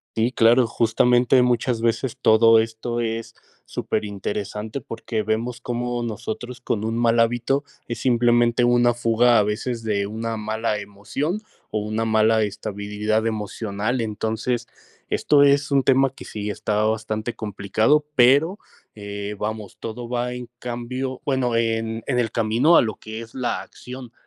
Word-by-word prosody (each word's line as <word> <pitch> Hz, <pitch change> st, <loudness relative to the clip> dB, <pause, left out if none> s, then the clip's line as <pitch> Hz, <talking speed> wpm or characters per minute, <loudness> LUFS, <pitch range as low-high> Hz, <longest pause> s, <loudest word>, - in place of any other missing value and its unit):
Sí, 115 Hz, +2 st, +2 dB
claro. 120 Hz, 0 st, +4 dB
Justamente 120 Hz, +3 st, +3 dB
muchas 125 Hz, -1 st, +1 dB
veces 115 Hz, +2 st, -1 dB
todo 115 Hz, -1 st, +6 dB
esto 115 Hz, +1 st, -2 dB
es 115 Hz, 0 st, -3 dB, 0.3 s
superinteresante, 105 Hz, +3 st, -4 dB
porque 115 Hz, -1 st, -4 dB
vemos 115 Hz, +3 st, -2 dB
cómo 120 Hz, 0 st, -2 dB
nosotros 120 Hz, +2 st, -5 dB
con 110 Hz, -3 st, -2 dB
un 115 Hz, +1 st, -1 dB
mal 115 Hz, 0 st, +3 dB
hábito, 120 Hz, +4 st, +1 dB, 0.2 s
es 120 Hz, -, -4 dB
simplemente 120 Hz, -1 st, +3 dB
una 120 Hz, 0 st, +4 dB
fuga, 120 Hz, 0 st, +3 dB
a 105 Hz, -, +5 dB
veces 115 Hz, +3 st, -2 dB
de 100 Hz, -2 st, 0 dB
una 115 Hz, +2 st, -4 dB
mala 110 Hz, 0 st, -2 dB
emoción 105 Hz, -, -4 dB, 0.3 s
o 110 Hz, -, -1 dB
una 110 Hz, +2 st, -2 dB
mala 110 Hz, 0 st, +3 dB
estabilidad 105 Hz, +1 st, -2 dB
emocional. 110 Hz, +2 st, -2 dB
Entonces, 110 Hz, +3 st, -2 dB, 0.4 s
esto 145 Hz, -1 st, +3 dB
es 140 Hz, 0 st, +3 dB
un 140 Hz, -1 st, +3 dB
tema 135 Hz, 0 st, +4 dB
que -, -, -12 dB
sí 105 Hz, -1 st, -4 dB
está 105 Hz, +1 st, -1 dB
bastante 110 Hz, +1 st, -2 dB
complicado. 110 Hz, +8 st, +1 dB
Pero, 140 Hz, +10 st, +4 dB, 0.4 s
eh, 100 Hz, 0 st, -6 dB
vamos, 105 Hz, -2 st, -5 dB
todo 115 Hz, +1 st, -6 dB
va 125 Hz, 0 st, -1 dB
en 125 Hz, -1 st, -8 dB
cambio 125 Hz, +2 st, -4 dB
Bueno, 130 Hz, -4 st, 0 dB
en 115 Hz, 0 st, -1 dB
en 125 Hz, -3 st, 0 dB
el 115 Hz, -3 st, +1 dB
camino 115 Hz, +9 st, +3 dB
a -, -, +7 dB
lo 110 Hz, -3 st, -3 dB
que 110 Hz, +1 st, -8 dB
es 115 Hz, -, -13 dB
la 125 Hz, -2 st, -2 dB
acción. 125 Hz, -1 st, -10 dB
115 Hz, 150 wpm, -23 LUFS, 110-125 Hz, 0.4 s, a